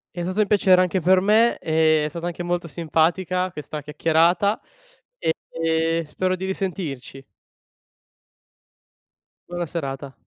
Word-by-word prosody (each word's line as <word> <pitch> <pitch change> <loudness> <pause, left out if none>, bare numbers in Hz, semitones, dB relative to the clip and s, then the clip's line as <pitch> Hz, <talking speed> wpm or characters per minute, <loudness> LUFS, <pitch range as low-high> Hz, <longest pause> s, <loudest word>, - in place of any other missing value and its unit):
È 175 - -4
stato 185 +4 -3
un 210 - +1
piacere 190 -3 +4
anche 185 +1 +1
per 185 +2 +4
me, 220 +4 +3
e 155 -1 +2
è - - -2
stata 170 +1 -6
anche 175 0 -5
molto 175 0 -2
simpatica 170 +4 0
questa 150 -1 -7
chiacchierata 165 +7 +2 0.6
e 165 0 -1
spero 185 +5 -1
di 185 +1 -5
risentirci. 170 -9 -5 2.3
Buona 175 0 -3
serata. 140 -4 -5
170 Hz, 125 wpm, -23 LUFS, 160-185 Hz, 2.3 s, piacere